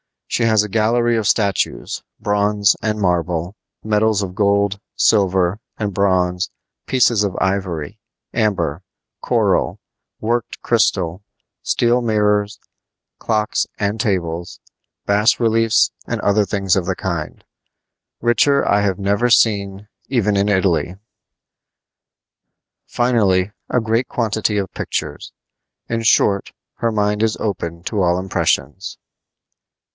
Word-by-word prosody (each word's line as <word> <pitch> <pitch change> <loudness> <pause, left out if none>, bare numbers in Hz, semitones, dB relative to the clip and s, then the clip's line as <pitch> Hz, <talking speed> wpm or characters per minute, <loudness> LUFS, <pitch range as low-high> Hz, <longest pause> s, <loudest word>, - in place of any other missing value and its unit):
She 120 - -1
has 110 -2 +3
a 105 - -5
gallery 115 +3 +2
of 110 -3 -1
statues, 100 -5 0 0.2
bronze 105 -1 +2
and 110 -1 -1
marble, 90 -1 -1 0.3
medals 110 -1 +1
of 90 -2 -5
gold, 100 0 +1 0.2
silver, 95 -2 +2 0.2
and 105 -2 -3
bronze, 90 -2 +1 0.4
pieces 120 -4 +3
of 100 -3 -2
ivory, 95 -6 -2 0.3
amber, 95 -9 0 0.4
coral, - - +1 0.4
worked 120 +1 -2
crystal, 85 +4 +1 0.4
steel 120 +1 +1
mirrors, 105 -2 +1 0.6
clocks 110 -1 0
and 105 +2 -2
tables, 90 -6 -2 0.5
bas 105 +3 +3
reliefs 115 -1 +3 0.2
and - - -2
other 100 +1 +2
things 95 -1 0
of 95 -3 0
the 95 +1 -1
kind; 85 -5 -4 0.8
richer 120 +4 +3
I 100 0 +3
have 100 -3 0
never 100 +4 +1
seen 100 -3 +2 0.2
even 110 -6 +1
in 100 +1 +1
Italy; 95 -3 +1 1.9
finally, 105 -6 +1 0.2
a 125 - +2
great 115 +3 0
quantity 110 -2 -1
of 95 -2 -3
pictures. - - -4 0.6
In 115 0 -1
short, 100 -2 +2 0.2
her 115 - -1
mind 105 0 0
is 110 -1 +1
open 85 -5 -4
to 105 +1 -2
all 90 -1 +2
impressions. 95 -2 -1
100 Hz, 115 wpm, -19 LUFS, 95-110 Hz, 1.9 s, has